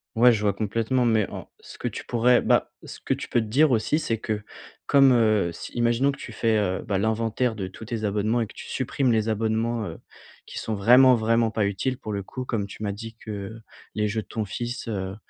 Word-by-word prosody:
Ouais 120 +2 +6
je 110 -3 0
vois 105 -1 +2
complètement 115 +5 0
mais 110 -3 +2
en, - - -8
ce - - -13
que - - -2
tu - - -6
pourrais, 120 +1 +3
bah, - - +2
ce - - -10
que - - 0
tu - - -7
peux - - +2
te 110 - -5
dire 140 +7 +4
aussi 115 +5 +2
c'est 120 -8 -2
que 105 -2 -3 0.4
comme, 135 -1 +6
heu, 110 -6 +3
si - - -9
imaginons 120 +3 +2
que 140 - -10
tu - - -8
fais, 115 0 +1
heu, 95 -2 -1
bah, 100 -2 0
l'inventaire 110 +2 0
de 100 -3 -4
tous 95 +4 -11
tes 115 -1 -4
abonnements 105 +3 0
et - - 0
que 110 - -14
tu - - -10
supprimes 130 0 0
les 110 -1 +1
abonnements, 110 0 -1
heu, 80 - -7 0.5
qui - - -7
sont 110 - -3
vraiment, 125 +5 +6
vraiment 115 0 +2
pas 110 -1 0
utiles 100 +6 -1
pour 110 - -6
le 100 - -2
coup, 130 +6 -7
comme 110 -5 -2
tu 105 - -9
m'as 100 - -1
dit 110 +3 -8
que 105 0 -7 0.4
les 105 0 +1
jeux 110 +1 -2
de - - -16
ton 110 -2 -3
fils, 120 +5 -5
heu, 95 -3 -3
110 Hz, 240 wpm, -25 LUFS, 105-120 Hz, 0.5 s, Ouais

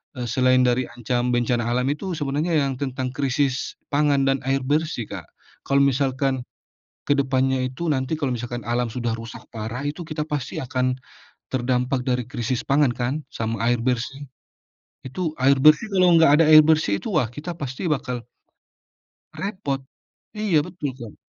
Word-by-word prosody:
eee, 125 - -4
selain 130 +1 +3
dari 125 0 +2
ancam 120 +1 -1
bencana 120 -1 +1
alam 125 +1 +1
itu 185 +5 -4
sebenarnya 150 +3 -1
yang 135 -1 -1
tentang 130 -2 -2
krisis 135 -1 -1 0.2
pangan 145 -1 +3
dan 135 0 +2
air 135 0 +1
bersih 150 -1 0
Kak, 95 -5 -7 0.4
kalau 140 0 +4
misalkan, 135 -1 +1 0.6
ke - - +1
depannya 130 -1 +1
itu 130 +6 -5
nanti 130 +1 0
kalau 140 -4 -1
misalkan 120 0 -4
alam 120 +1 0
sudah 115 0 -2
rusak 115 0 -9
parah 115 +4 -5
itu 165 +2 -8
kita 155 -1 -3
pasti 150 -4 -4
akan, 130 0 0 0.5
terdampak 125 0 0
dari 125 -2 -1
krisis 125 -1 -3
pangan 140 -1 +3
kan 120 +2 -2 0.2
sama 115 0 -3
air 120 - +2
bersih, 130 +3 -2 0.8
itu 155 +4 -3
air 135 +1 +4
bersih 155 +7 +6
kalau 185 -1 +4
nggak 160 -3 +6
ada - - +7
air 155 0 +9
bersih 155 -11 +3
itu 215 - -5
wah 135 -8 +2
kita 145 +9 -6
pasti 135 +6 -4
bakal 125 -3 -3 1.1
repot, 185 -9 -3 0.6
iya 205 -7 +2
betul 170 -5 -4
Kak. 115 -3 -9
130 Hz, 160 wpm, -23 LUFS, 125-145 Hz, 1.1 s, air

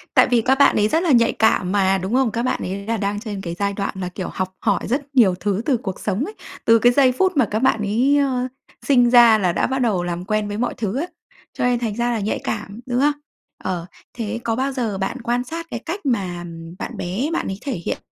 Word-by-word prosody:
Tại - - +6
vì 240 -2 +3
các 265 +4 +3
bạn 280 - +6
ấy 210 0 +3
rất 325 +9 +1
là 330 - +2
nhạy 235 -2 +4
cảm 200 -4 +2
mà, 195 -1 +3
đúng 190 +4 -4
không? 255 -3 +2
Các 235 - -2
bạn 255 - 0
ấy 200 +2 -4
là 230 0 -1
đang 205 0 -2
trên 205 -3 -6
cái 170 -2 -5
giai 200 0 0
đoạn 200 0 -3
là, 180 - -3
kiểu, 180 0 -5
học 185 0 -3
hỏi 200 -4 +1
rất 275 +3 -3
nhiều 200 -8 +5
thứ 200 +2 -1
từ 275 -5 +2
cuộc 195 -5 -6
sống 210 +6 -1
ấy, 415 - -7 0.3
từ 230 0 +6
cái 245 +1 +5
giây 260 0 +4
phút 370 +4 +1
mà 260 - +5
các 215 - 0
bạn 260 -3 +2
ấy, 245 +8 +2
ơ, 255 -3 +1 0.4
sinh 245 -4 +4
ra 235 -2 +7
là 185 -4 +1
đã - - +1
bắt 265 0 -1
đầu 200 -7 +1
làm 175 0 -4
quen 215 +1 0
với 205 - -4
mọi 245 +2 -1
thứ 225 0 -2
ấy. 330 - -2 0.5
Cho - - -3
nên 245 -1 +2
thành 225 -4 -2
ra 240 +1 0
là 230 - -1
nhạy 205 +1 -1
cảm, 210 0 -4
đúng 245 0 -1
không? 295 +2 +4 0.5
Ờ, 175 -2 -3 0.3
thế 230 0 -3
có 225 -1 0
bao 265 +2 -1
giờ 230 -7 -2
bạn 195 +7 -3
quan 245 +1 0
sát 330 +5 -6
cái - - -3
cách 345 +1 -6
mà, 185 -9 -1
ừm, 165 0 -9
bạn - - -5
bé 205 - -2
bạn - - -1
ấy 195 - -4
thể 275 -3 -3
hiện - - -1
225 Hz, 265 wpm, -21 LUFS, 195-255 Hz, 0.5 s, ra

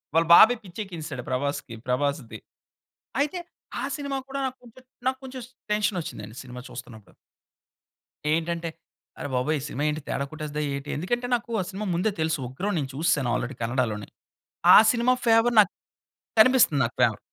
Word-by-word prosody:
వాళ్ళ 165 +1 +4
బాబాయి 245 +7 +9
పిచ్చి 185 +1 -11
ఎక్కించేసాడు 160 -9 -6
ప్రభాస్‌కి 130 -2 -2
ప్రభాస్‌ది. 125 -3 -1 0.8
అయితే 295 +5 0 0.4
ఆ - - -3
సినిమా 280 -2 -3
కూడా 275 +1 -4
నాకొంచెం 255 -1 -8 0.2
నాకొంచెం 260 0 -3 0.3
టెన్షన్ 210 -2 +1
వచ్చిందండి 105 -7 -8
సినిమా 125 -1 -9
చూస్తున్నప్పుడు. 115 -4 -11 1.2
ఏంటంటే, 165 +1 -1 0.5
"అరె - - -4
బాబోయ్ 145 +5 +1
ఈ - - -7
సినిమా 145 - -3
ఏంటి 150 +1 -3
తేడా 140 - -1
కొట్టేస్ధా 150 -1 -4
ఏటి?" 140 +1 -6
ఎందుకంటే 240 +10 -1
నాకు 235 0 -5
ఆ - - -1
సినిమా 205 +1 -4
ముందే 185 +5 +1
తెలుసు. 160 -1 0
ఉగ్రం 190 +11 -3
నేను 135 -3 -3
చూస్సేను 145 -5 +1
ఆల్రెడీ 130 +3 -3
కన్నడలోనే. 115 -3 -1 0.7
ఆ - - +11 0.2
సినిమా 245 +1 +3
ఫేవర్ 230 +1 +4
నాక్ 200 - +3 0.7
కనిపిస్తుంది 220 - +6
నాకు 115 - -5
ఫేవర్. - - +3
160 Hz, 150 wpm, -26 LUFS, -, 1.2 s, ఆ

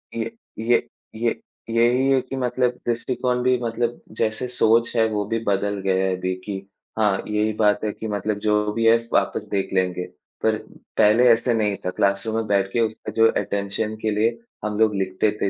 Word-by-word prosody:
ये 115 0 -2 0.3
ये 120 +1 +2 0.3
ये 115 +1 -1 0.3
यही 120 +4 +3
है 130 -1 +4
कि 130 +1 -7
मतलब 125 -1 0
दृष्टिकोण 125 +1 -1
भी 130 0 +3
मतलब 115 +1 -2 0.2
जैसे 110 +3 -1
सोच 115 -1 +2
है 115 -1 +4
वो 105 -1 -1
भी 115 +1 -1
बदल 100 0 0
गया 95 0 +2
है 95 -1 +1
अभी 90 0 -2
कि 100 -2 -3 0.4
हाँ, 105 -3 +2
यही 105 0 0
बात 105 0 +3
है 105 - 0
कि 110 - -6
मतलब 105 0 -2
जो 105 0 +2
भी 115 0 0
है 115 +1 +7 0.2
वापस 105 - +1
देख 100 -1 -1
लेंगे। 90 -1 0 0.4
पर - - +3 0.4
पहले 110 +4 +5
ऐसा 115 +1 +2
नहीं 105 -3 +1
था - - +1
क्लासरूम 100 +4 0
में 115 -1 -1
बैठ 100 -1 +1
के 120 - +1
उसका 110 -1 -2
जो 115 0 +7
अटेंशन 100 +2 -2
के 110 - 0
लिए 115 +3 +1 0.3
हम 105 0 -2
लोग 110 -2 +3
लिखते 95 +2 0
थे, 100 - +2
110 Hz, 195 wpm, -23 LUFS, 100-115 Hz, 0.4 s, है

